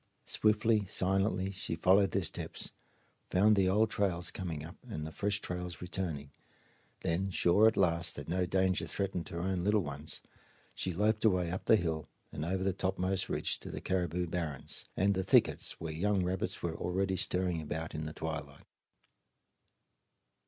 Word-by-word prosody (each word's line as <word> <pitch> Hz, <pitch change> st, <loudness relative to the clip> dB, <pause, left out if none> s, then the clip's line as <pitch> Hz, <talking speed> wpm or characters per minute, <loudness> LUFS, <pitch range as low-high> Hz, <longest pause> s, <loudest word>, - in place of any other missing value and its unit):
Swiftly, 105 Hz, -1 st, +2 dB
silently 95 Hz, 0 st, +1 dB
she 95 Hz, -3 st, -3 dB
followed 95 Hz, +4 st, +4 dB
their 100 Hz, -, 0 dB
steps; -, -, -3 dB, 0.6 s
found 105 Hz, +3 st, +5 dB
the 95 Hz, -2 st, +3 dB
old 105 Hz, +3 st, +3 dB
trails 90 Hz, -4 st, 0 dB
coming 80 Hz, -6 st, -4 dB
up 85 Hz, +4 st, -10 dB
and 75 Hz, -8 st, -4 dB
the 80 Hz, -, -6 dB
fresh 100 Hz, +4 st, -1 dB
trails 90 Hz, -2 st, -5 dB
returning; 85 Hz, -6 st, -4 dB, 0.7 s
then, 90 Hz, +4 st, 0 dB
sure 95 Hz, +4 st, +5 dB
at 110 Hz, -, +2 dB
last 85 Hz, -3 st, +2 dB
that 75 Hz, -, -7 dB
no 90 Hz, +2 st, 0 dB
danger 95 Hz, 0 st, +1 dB
threatened 95 Hz, -3 st, -2 dB
her 85 Hz, -, -4 dB
own 90 Hz, 0 st, -1 dB
little 105 Hz, 0 st, +3 dB
ones, 75 Hz, +1 st, -6 dB, 0.5 s
she 95 Hz, -, -2 dB
loped 105 Hz, +5 st, +1 dB
away 90 Hz, -6 st, +3 dB
up 90 Hz, -, -4 dB
the -, -, +7 dB
hill 80 Hz, -5 st, -2 dB, 0.2 s
and 75 Hz, -, -4 dB
over 95 Hz, +3 st, -1 dB
the 95 Hz, -1 st, +1 dB
topmost 95 Hz, 0 st, 0 dB
ridge -, -, -1 dB
to -, -, -8 dB
the -, -, -5 dB
caribou 90 Hz, -1 st, -1 dB
barrens 80 Hz, -5 st, -3 dB
and 100 Hz, +2 st, +3 dB
the 95 Hz, 0 st, -1 dB
thickets -, -, +3 dB
where 80 Hz, -1 st, -4 dB
young 95 Hz, +3 st, +1 dB
rabbits 90 Hz, +1 st, -2 dB
were -, -, -1 dB
already 95 Hz, +2 st, 0 dB
stirring 90 Hz, -2 st, +1 dB
about 80 Hz, +2 st, -4 dB
in 75 Hz, 0 st, -3 dB
the 75 Hz, -, -6 dB
twilight. 70 Hz, -4 st, -5 dB
90 Hz, 165 wpm, -32 LUFS, 85-95 Hz, 0.7 s, the